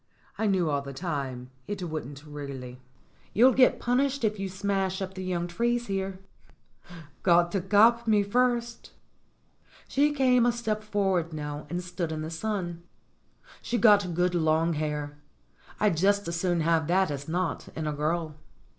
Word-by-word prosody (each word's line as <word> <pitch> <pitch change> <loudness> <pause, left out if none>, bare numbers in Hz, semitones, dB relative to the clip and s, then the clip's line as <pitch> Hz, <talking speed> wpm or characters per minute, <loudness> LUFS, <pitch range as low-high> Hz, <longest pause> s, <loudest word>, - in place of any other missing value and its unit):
I 220 - 0
knew 185 -4 +2
all 145 -2 0
the 140 0 -8
time 135 -5 -4 0.2
it 200 -3 -4
wouldn't 150 -3 -6
really." 135 -4 -8 0.5
"You'll 250 +4 +6
get 255 0 +4
punished 265 +2 0
if 215 -2 0
you 195 -1 -3
smash 195 0 -1
up 190 -1 -4
the 190 -1 -6
young 180 -2 -2
trees 235 +7 -1
here." 195 -2 -3 1.0
"Got 175 -1 +4
to 195 - 0
cop 225 +5 +4
me 210 -2 +4
first." 240 +2 0 0.9
She 290 +2 +2
came 255 -4 +3
a - - +4
step 220 -3 -2
forward 195 -6 0
now 150 -1 -5
and 175 +1 -3
stood 175 -2 -4
in 155 -1 -4
the 160 - -5
sun. 175 -2 -3 0.8
She'd 240 0 -2
got 205 -6 +5
good 180 +1 +1
long 165 0 +2
hair. 150 -1 -3 0.6
I'd 205 -6 +2
just 200 +3 +2
as 170 - -2
soon 175 -1 0
have 160 -1 +2
that 185 -1 +2
as 145 0 -5
not, 175 +1 -2
in 160 - -3
a 150 - -1
girl. 155 +2 -1
180 Hz, 165 wpm, -27 LUFS, 155-210 Hz, 1.0 s, You'll